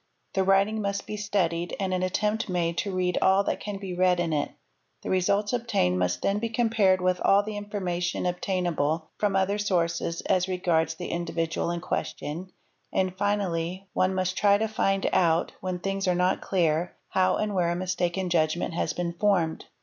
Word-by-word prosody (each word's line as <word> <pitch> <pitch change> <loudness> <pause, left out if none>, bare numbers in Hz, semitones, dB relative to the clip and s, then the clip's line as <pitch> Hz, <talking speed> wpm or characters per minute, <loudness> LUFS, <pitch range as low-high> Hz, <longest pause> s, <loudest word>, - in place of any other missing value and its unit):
The 190 - +2
writing 195 +3 +3
must 200 -1 -2
be 215 - -5
studied 180 -5 -1
and 190 -2 -1
an 185 - 0
attempt 210 +4 0
made 170 -2 0
to 200 - -2
read 180 -1 +1
all 190 +1 +4
that - - -1
can 205 -1 -5
be 195 -2 -6
read 180 0 +3
in 170 -2 0
it; 145 -1 0 0.5
the - - -3
results 200 +3 +1
'obtained 210 - +1
must 90 0 0
then 200 +1 +1
be 230 +1 -2
compared 220 -5 +2
with 180 0 +1
all 200 +1 +5
the 215 0 -5
information 185 -5 -2
obtainable 175 -4 -1
from 205 -2 +1
other 195 +2 +1
sources 170 -4 0
as 185 0 +1
regards 175 -3 +1
the 175 +1 -6
individual 165 -1 -2
in 170 0 -2
question, 180 0 -4 0.4
and, 185 -1 0
finally,; 190 -2 -1
'one 185 +1 +1
must 185 0 0
try 200 -1 +4
to 220 +1 0
find 195 -3 0
out, 165 -1 +3
when 185 -1 -2
things 195 +1 -2
are 180 - +3
not 180 +1 +1
clear, 170 -2 0
how 185 0 +2
and 210 -1 -1
where 175 -3 +1
a 170 - 0
mistaken 180 0 -1
judgment 170 0 +1
has 170 - -1
been 175 -1 -2
formed. 175 -4 +1
185 Hz, 185 wpm, -27 LUFS, 175-200 Hz, 0.5 s, all